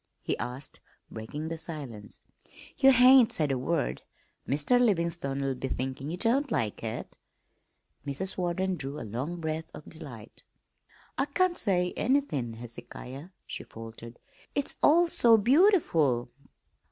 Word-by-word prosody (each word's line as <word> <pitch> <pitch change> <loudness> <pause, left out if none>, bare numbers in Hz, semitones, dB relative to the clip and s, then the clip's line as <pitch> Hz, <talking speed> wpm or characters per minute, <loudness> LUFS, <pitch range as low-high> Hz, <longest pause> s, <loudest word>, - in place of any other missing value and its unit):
he - - -1
asked, 125 +3 -6 0.3
breaking 145 +8 -6
the 165 -1 -5
silence. 140 - -7 0.5
"Ye 270 - +6
hain't 255 -2 +7
said 150 -9 +1
a 135 - 0
word. 155 +4 -1 0.5
Mr. 145 - +3
Livin'stone'll 165 - 0
be 130 +1 -4
thinkin' 130 +2 -4
ye 175 - -4
don't 265 +8 +1
like 110 - -1
it." 110 -1 -6 0.8
Mrs. 145 +7 -2
Warden 185 +1 -1
drew 140 +1 -5
a - - -6
long 130 +11 -4
breath 160 0 -3
of - - -11
delight. 125 -9 -9 0.8
"I - - +3
can't 370 -2 +1
say 180 - 0
anythin', 210 - 0
Hezekiah," 120 +5 -9 0.2
she - - -5
faltered. 115 +1 -10 0.4
"It's 285 - -1
all 340 +3 +5
so 235 -8 +6
beautiful." 210 - +3
155 Hz, 130 wpm, -29 LUFS, 130-215 Hz, 0.8 s, hain't